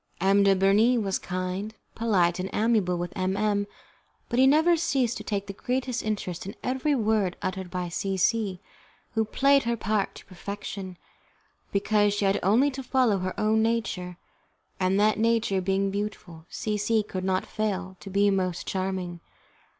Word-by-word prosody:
M. 195 +2 +4
de 195 -1 +5
Bernis 205 +6 +4
was 195 -4 0
kind, 185 +4 -4 0.2
polite, 185 -6 +1
and 185 +1 -3
amiable 210 -5 +2
with 175 0 -4
M 190 +1 -1
M, 205 -1 +1 0.6
but 240 - 0
he 265 - +7
never 320 +5 +5
ceased 270 -7 0
to - - -7
take 200 -2 -2
the 200 - -6
greatest 250 +3 -2
interest 190 -4 -3
in 200 - -6
every 265 +3 0
word 215 -6 +1
uttered 185 -1 -3
by 180 0 -3
C 190 +3 -2
C, 200 -1 +1 0.5
who 225 -2 +1
played 275 +5 +3
her 235 0 0
part 215 -2 -1
to - - -12
perfection, 195 -1 -7 0.7
because 205 0 +2
she 205 - 0
had 195 +1 +2
only 235 +10 +3
to 270 0 -6
follow 250 -6 +2
her 185 0 -4
own 215 +1 +3
nature, 220 -6 -1 0.6
and, 190 +1 +2
that 215 +1 +3
nature 225 -4 +2
being 195 +1 0
beautiful, 190 -5 -5
C 210 -1 -2
C 220 +1 +2
could 185 -2 -5
not 185 0 0
fail 190 -3 -3
to 195 - -9
be 200 +1 +3
most 185 -3 -1
charming. 185 -2 -3
200 Hz, 170 wpm, -26 LUFS, 185-225 Hz, 0.7 s, he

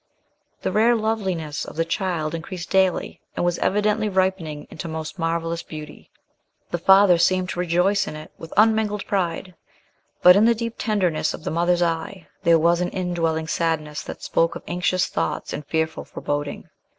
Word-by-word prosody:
The - - 0
rare 230 +3 +4
loveliness 190 -9 -2
of - - -9
the 165 +1 0
child 165 -3 -2
increased 170 +1 -6
daily, 190 -2 +1
and - - 0
was 175 -1 0
evidently 210 +2 +1
ripening 185 -6 -1
into 160 - -6
most 160 +3 -6
marvellous 165 0 -1
beauty. 155 -1 -10 0.6
The 175 - -1
father 190 0 +6
seemed 185 +1 +2
to 175 - -4
rejoice 180 +3 +2
in - - -5
it 155 0 -10
with 165 - -11
unmingled 215 -1 +3
pride; 185 -1 -2 0.7
but 180 0 +9
in 205 +2 +5
the 235 0 +4
deep 230 0 -3
tenderness 190 -8 0
of - - -13
the - - -3
mother's 175 +2 +2
eye, 170 +2 -3 0.2
there 165 0 +5
was 170 +2 +3
an 180 - 0
indwelling 165 -3 -1
sadness 155 -3 -1
that - - -8
spoke 165 0 +1
of - - -7
anxious 180 +1 +1
thoughts 80 - -3
and 150 - -6
fearful 160 0 -1
foreboding. 145 0 -4
175 Hz, 170 wpm, -23 LUFS, 165-195 Hz, 0.7 s, but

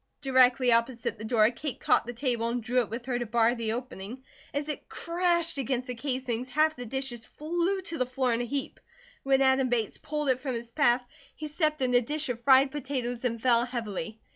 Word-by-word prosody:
Directly 255 -1 +4
opposite 235 -1 +1
the - - -7
door 220 0 +3
Kate 280 +1 -5
caught - - +2
the 240 - -4
table 240 -2 0
and 240 0 -2
drew 250 +2 +1
it 235 - -1
with 235 +2 -6
her 250 -2 -1
to 240 - -2
bar 230 +1 +3
the 230 -2 -2
opening. 245 0 -6 0.3
As 285 +1 -3
it 300 - -6
crashed 340 -2 0
against 255 -1 -1
the 250 - -3
casing 250 -2 -2
half 310 +4 +2
the 245 -1 -7
dishes 260 -1 -4
flew 345 +5 -1
to 335 -4 -5
the 255 - +1
floor 255 -1 0
in 230 - 0
a - - -2
heap. 275 +3 -4 0.4
When 270 0 +3
Adam 265 -1 +3
Bates 230 -3 -1
pulled 300 -2 -2
it 255 -1 +2
from 260 -2 -3
his 235 0 -6
path 245 -3 +3 0.3
he 305 - -6
stepped 305 -2 0
in 250 -1 +1
a 245 - +6
dish 295 +4 -3
of 235 -1 -3
fried 265 +1 +5
potatoes 255 -4 -3
and 230 -2 -1
fell 235 0 +4
heavily. 225 -2 -5
255 Hz, 215 wpm, -28 LUFS, 235-280 Hz, 0.4 s, a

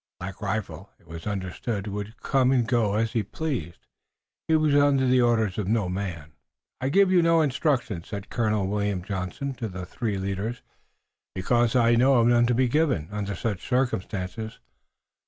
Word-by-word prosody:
Black 95 +3 -7
Rifle, 100 -3 -4
it - - -26
was 80 +2 -8
understood, 100 +2 -3
would 105 +2 -5
go 135 -2 +2
and 130 0 +4
come 110 -5 +1
as 110 +1 0
he 115 - +1
pleased. 115 - -5 0.6
He 160 - +3
was 155 -2 +3
under 145 -2 +4
the 125 0 +4
orders 110 -5 +2
of 100 - -2
no 105 -3 +1
man. 90 -5 -5 0.5
"I 130 - 0
give 195 +4 +4
you 180 -2 +5
no 165 -1 +4
instructions," 130 - 0
said 100 -2 -7
Colonel 110 -4 +1
William 100 -2 -1
Johnson 100 +7 -4
to 115 - -1
the 90 -2 -6
three 105 +2 -3
leaders, 100 +5 -3 0.7
"because 120 +6 +1
I 120 -1 +4
know 130 +3 +4
of 115 -2 +4
none 120 0 +4
to 120 - +2
be 130 +1 +3
given 130 - +1
under 100 -1 -3
such 100 -1 -3
circumstances. 110 -4 -2
110 Hz, 175 wpm, -26 LUFS, 95-125 Hz, 0.7 s, you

